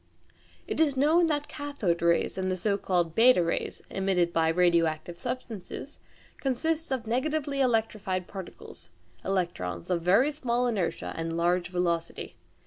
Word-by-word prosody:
It - - -3
is 290 -4 +3
known 320 +5 +4
that 295 -2 -1
cathode 280 - -2
rays 170 0 +2
and 190 0 -1
the 185 - -1
so 200 +3 +1
called 175 -4 0
b 245 +6 +7
rays 170 -1 -1
emitted 185 -3 +1
by 165 -1 +2
radioactive 170 -1 +1
substances 245 -1 -6 0.4
consist 315 +4 -1
of 255 -3 -1
negatively 275 +4 -1
electrified 215 -6 0
particles 190 -1 -10 0.3
(electrons) 170 - -2
of 170 -2 +1
very 200 - +4
small 250 -4 -1
inertia 210 -8 -2
and 165 0 -3
large 175 +1 +1
velocity. 170 -2 -2
195 Hz, 135 wpm, -28 LUFS, 175-260 Hz, 0.4 s, b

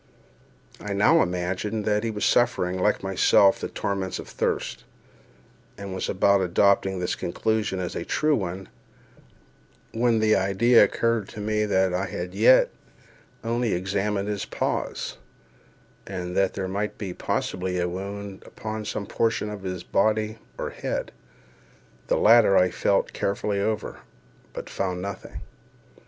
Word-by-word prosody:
I 105 - -4
now 130 +12 +5
imagined 95 +4 -2
that 105 0 +1
he 115 - -1
was 105 -1 -2
suffering, 95 -6 +2
like 90 - +1
myself, 95 +1 +4
the - - -3
torments 95 -2 -3
of - - -8
thirst, - - -2 0.9
and 100 -1 -6
was 95 - -3
about 100 +1 +3
adopting 95 +1 +2
this 90 -1 -1
conclusion 105 +1 -1
as 90 - -3
the - - -4
true 155 -1 +1
one, 95 -3 -4 1.2
when 115 0 +2
the 110 0 +3
idea 100 +6 +5
occurred 115 0 0
to - - -9
me 105 +1 0
that 95 -3 +2
I 95 +2 -1
had 90 +1 -5
as 90 - -14
yet 120 +4 +6 0.7
only 115 0 0
examined 100 +2 -1
his 105 -2 -2
paws, - - -3 0.9
and 90 -2 -5
that 95 -1 +1
there 95 -1 -2
might 100 +3 -3 0.2
possibly 90 0 -2
be 90 - -1
a 90 - 0
wound 100 +2 -6
upon 110 0 -6
some 100 - -3
portion 110 0 0
of 105 -2 -7
his 90 -2 -5
body 110 +1 0 0.2
or - - -4
head. - - -4 1.0
The - - +2
latter 110 -3 +6
I 90 0 +4
felt 100 +2 +1
carefully 100 0 -1
over, 110 +1 -2 0.5
but - - -7
found 90 -2 -3
nothing. 100 0 -7
100 Hz, 145 wpm, -25 LUFS, 95-110 Hz, 1.2 s, yet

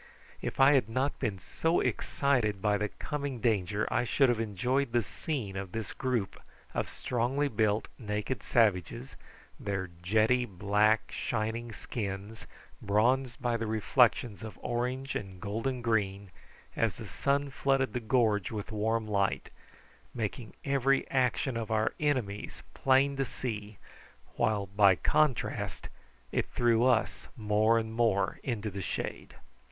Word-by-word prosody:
If - - -4
I 135 +2 +7
had 130 -6 +3
not 130 +5 -1
been 100 -3 -1
so 160 - 0
excited 120 -8 +1
by 105 0 +2
the 105 - -1
coming 140 -1 -4
danger 105 -3 +1
I - - +2
should 135 +2 +3
have 120 -2 +1
enjoyed 125 +4 0
the 120 -1 +3
scene 115 - -4
of 95 -2 -5
this 115 -3 -4
group 125 -7 -2 0.3
of - - -1
strongly 125 +4 0
built 110 -3 +1
naked 105 +3 -3
savages, 115 +3 +1 0.4
their 95 -3 -3
jetty 110 +7 +3
black, 105 +2 +2
shining 115 +1 -2
skins 105 -1 -5 0.3
bronzed 120 +5 +2
by 120 -1 +1
the 115 -1 -3
reflections 110 -1 +2
of 110 -1 -8
orange 125 +3 -2
and 95 -2 -5
golden 115 +6 -3
green 100 -4 0 0.4
as - - +1
the - - -8
sun 140 0 0
flooded 135 0 +1
the 125 - -1
gorge 110 -4 +2
with 105 -1 -5
warm 110 +1 0
light, 100 -2 0 0.6
making 110 0 -4
every 135 -1 +2
action 130 0 +1
of 115 -2 -3
our 110 0 +1
enemies 125 -9 -2
plain 135 +1 +3
to 135 - +1
see, 105 -5 -5 0.6
while 105 -2 +1
by 100 0 +5
contrast 150 - 0 0.4
it - - 0
threw 120 -1 +2
us 120 -4 +1
more 110 +1 +3
and 110 0 -2
more 110 -5 +1
into 110 -4 -3
the 95 +1 -5
shade. 85 - -4
115 Hz, 140 wpm, -30 LUFS, 105-130 Hz, 0.6 s, I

